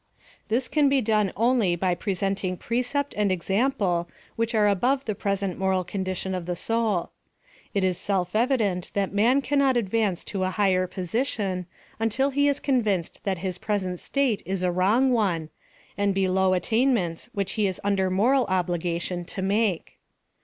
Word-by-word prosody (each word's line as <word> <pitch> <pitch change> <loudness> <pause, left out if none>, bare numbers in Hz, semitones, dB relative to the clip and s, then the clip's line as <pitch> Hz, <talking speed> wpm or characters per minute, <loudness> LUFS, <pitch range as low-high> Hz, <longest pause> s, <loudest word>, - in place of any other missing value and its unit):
This 245 +3 0
can 295 -2 +3
be 275 0 +3
done 215 -4 +1
only 230 -5 +2
by 180 +1 +1
presenting 190 0 -2
precept 250 +6 -1
and 205 -2 +1
example 190 -2 0 0.3
which 230 0 -1
are 210 -1 +4
above 250 +8 +1
the 215 - -1
present 200 -2 -2
moral 190 -1 +1
condition 190 0 -3
of 180 -2 -4
the 180 - -1
soul. 225 -2 0 0.6
It 200 - +2
is 185 -2 +1
seli 190 -4 0
evident 215 -6 +1
that 200 -1 0
man 240 +7 +3
cannot 275 -3 +2
advance 210 -4 0
to 195 -2 -3
a 185 - +1
higher 185 -2 +2
posi 195 +9 -2
tion 185 -7 -3 0.3
until 245 +5 +1
he 285 +1 +2
is 285 -1 +1
convinced 215 - 0
that 195 -2 0
his 185 -1 -3
present 185 -4 -2
state 270 -7 0
is 185 +1 -3
a 180 - +2
wrong 210 +9 +3
one, 185 -9 0 0.5
and 200 -1 0
below 190 -1 +2
attainments 220 -2 0
which 200 -2 -2
he 210 -2 +1
is 185 - -4
under 195 -2 +1
moral 245 +8 +3
obligation 175 -1 -1
to 190 +2 -5
make. 200 -2 0
200 Hz, 165 wpm, -25 LUFS, 185-230 Hz, 0.6 s, are